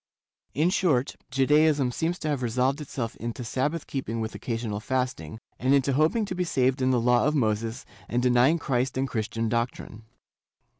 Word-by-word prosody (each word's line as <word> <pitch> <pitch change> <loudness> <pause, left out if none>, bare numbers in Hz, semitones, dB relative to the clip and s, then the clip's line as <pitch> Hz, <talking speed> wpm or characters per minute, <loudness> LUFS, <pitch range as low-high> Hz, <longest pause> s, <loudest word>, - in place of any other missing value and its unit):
In 160 +6 +2
short, 145 -9 +1
Judaism 140 +1 +3
seems 165 +7 -1
to 155 - -5
have 145 -4 -1
resolved 130 +4 0
itself 125 -5 -4
into 120 +2 -5
Sabbath 145 +7 -2
keeping 115 -4 -4
with 110 0 -3
occasional 115 -3 -3
fasting, 125 - -3 0.2
and 130 +3 +3
into 140 0 +2
hoping 160 - +2
to 190 - -4
be 180 0 -1
saved 130 -5 +1
in 130 - +2
the 125 -2 +3
Law 125 +3 +3
of 150 - +1
Moses 115 -1 -1 0.2
and 120 - +1
denying 125 +5 +4
Christ 130 -4 -1
and 135 +1 0
Christian 115 -1 -2
doctrine. 115 -1 -3
130 Hz, 170 wpm, -26 LUFS, 115-145 Hz, 0.2 s, denying